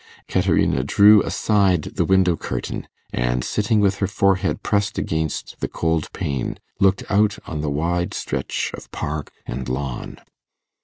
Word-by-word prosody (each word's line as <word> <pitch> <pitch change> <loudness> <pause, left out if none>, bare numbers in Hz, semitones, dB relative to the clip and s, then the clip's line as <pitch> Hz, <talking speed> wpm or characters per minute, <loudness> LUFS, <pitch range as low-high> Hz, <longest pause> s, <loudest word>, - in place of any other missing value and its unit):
Caterina 65 - +2
drew 100 +8 +6
aside 95 -6 +2
the - - -2
window 95 -2 +4
curtain; - - -4 0.3
and, - - 0
sitting 105 +1 +1
with 100 -1 +2
her 100 - 0
forehead 100 -1 +1
pressed 100 +1 0
against 80 -1 -2
the - - -1
cold 80 -1 -1
pane, 70 -3 -3 0.2
looked 95 0 +3
out 105 0 +2
on 75 -3 -4
the 75 - -1
wide 85 +4 -1
stretch 65 0 -2
of - - -9
park 75 0 -4
and 65 0 -5
lawn. 65 0 -4
85 Hz, 145 wpm, -22 LUFS, 70-100 Hz, 0.3 s, drew